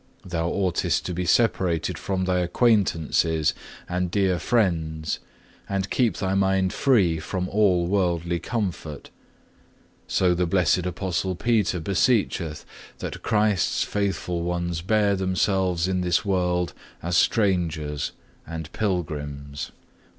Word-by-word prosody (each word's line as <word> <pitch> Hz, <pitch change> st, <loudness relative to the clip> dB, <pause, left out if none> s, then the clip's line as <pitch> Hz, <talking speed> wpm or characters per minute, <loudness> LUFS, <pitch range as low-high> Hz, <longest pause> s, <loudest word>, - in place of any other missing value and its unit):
Thou 85 Hz, -2 st, -1 dB
oughtest 90 Hz, -3 st, 0 dB
to 90 Hz, -, -3 dB
be 90 Hz, +1 st, -2 dB
separated 90 Hz, -6 st, +2 dB
from 95 Hz, -1 st, -2 dB
thy 90 Hz, 0 st, +1 dB
acquaintances 85 Hz, -, +2 dB, 0.3 s
and 90 Hz, 0 st, -1 dB
dear 95 Hz, -1 st, +1 dB
friends, 80 Hz, -6 st, 0 dB, 0.5 s
and 95 Hz, 0 st, -2 dB
keep 115 Hz, -8 st, +2 dB
thy 95 Hz, 0 st, -1 dB
mind 95 Hz, -1 st, +2 dB
free 95 Hz, -, +3 dB
from 90 Hz, +3 st, -3 dB
all 95 Hz, -4 st, +3 dB
worldly 85 Hz, -2 st, 0 dB
comfort. 90 Hz, -10 st, -4 dB, 1.0 s
So 90 Hz, -2 st, +2 dB
the 90 Hz, 0 st, 0 dB
blessed 90 Hz, 0 st, +2 dB
Apostle 90 Hz, +1 st, -2 dB
Peter 105 Hz, -3 st, +1 dB
beseecheth, 95 Hz, -3 st, 0 dB, 0.3 s
that -, -, -6 dB
Christ's 105 Hz, -4 st, +2 dB
faithful 95 Hz, -4 st, -2 dB
ones 85 Hz, -1 st, -2 dB
bear 105 Hz, +1 st, +2 dB
themselves 95 Hz, -2 st, +1 dB
in 95 Hz, -1 st, 0 dB
this 90 Hz, +1 st, +1 dB
world 90 Hz, -2 st, 0 dB, 0.3 s
as 85 Hz, +1 st, -1 dB
strangers 85 Hz, -9 st, +1 dB, 0.4 s
and 80 Hz, -1 st, -6 dB
pilgrims. 75 Hz, -7 st, -3 dB
90 Hz, 115 wpm, -25 LUFS, 85-95 Hz, 1.0 s, free